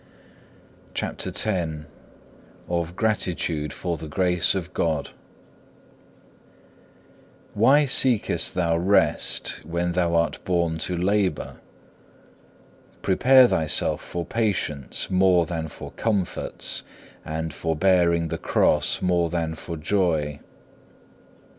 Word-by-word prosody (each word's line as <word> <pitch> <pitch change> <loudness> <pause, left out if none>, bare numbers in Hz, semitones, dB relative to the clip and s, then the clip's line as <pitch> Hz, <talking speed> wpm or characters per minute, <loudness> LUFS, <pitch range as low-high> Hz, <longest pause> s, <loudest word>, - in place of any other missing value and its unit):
CHAPTER - - -3
X 85 -7 -1 0.8
Of 85 0 -2
gratitude 85 -8 -1
for 85 -2 -4
the 80 - -8
Grace 90 +3 +2
of 90 -1 -5
God 80 -4 -1 2.4
Why 135 +8 +4
seekest 130 -4 +3
thou 85 -2 +1
rest 100 +4 +1
when 85 +2 -2
thou 85 -1 0
art 85 -2 0
born 85 -3 0
to 90 - -2
labour? 95 -2 -1 1.5
Prepare 130 +6 +5
thyself 80 -8 0
for 85 -1 -5
patience 100 - -2
more 90 -2 +4
than 80 -1 -4
for - - -10
comforts, 100 -6 -2 0.4
and 80 0 -4
for 80 +2 -2
bearing 85 -2 +2
the - - -4
cross - - +1
more 90 -2 +1
than 80 -1 -2
for 80 +1 -7
joy. 80 -4 0
85 Hz, 100 wpm, -24 LUFS, 80-95 Hz, 2.4 s, Prepare